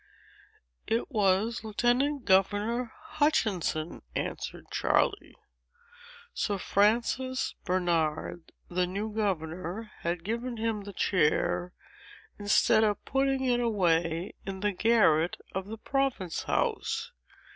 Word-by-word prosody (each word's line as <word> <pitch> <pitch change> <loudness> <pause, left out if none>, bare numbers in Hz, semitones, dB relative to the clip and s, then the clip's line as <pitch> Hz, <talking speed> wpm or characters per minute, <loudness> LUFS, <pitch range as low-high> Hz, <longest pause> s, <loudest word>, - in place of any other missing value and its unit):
"It 230 +5 -1
was 210 +1 +2
Lieutenant 245 +5 +1
Governor 210 +5 +2
Hutchinson," 215 - 0
answered - - -4
Charley. - - +1 1.0
"Sir 205 -2 -1
Francis 235 +7 +1
Bernard, 170 -2 -1 0.2
the 180 0 0
new 205 +4 -4
governor, 185 +1 -3
had 170 0 -2
given 235 +4 -3
him 220 -2 -2
the 200 - -8
chair, 175 0 +1 0.7
instead 205 +1 +4
of 210 -2 0
putting 270 0 +1
it 245 -2 +2
away 175 -6 +1
in 190 -1 -6
the 205 0 +1
garret 180 -6 +3 0.2
of 190 +1 -3
the 225 +2 -6
Province 265 -8 -1
House. 455 0 -1
210 Hz, 105 wpm, -29 LUFS, 180-240 Hz, 1.0 s, instead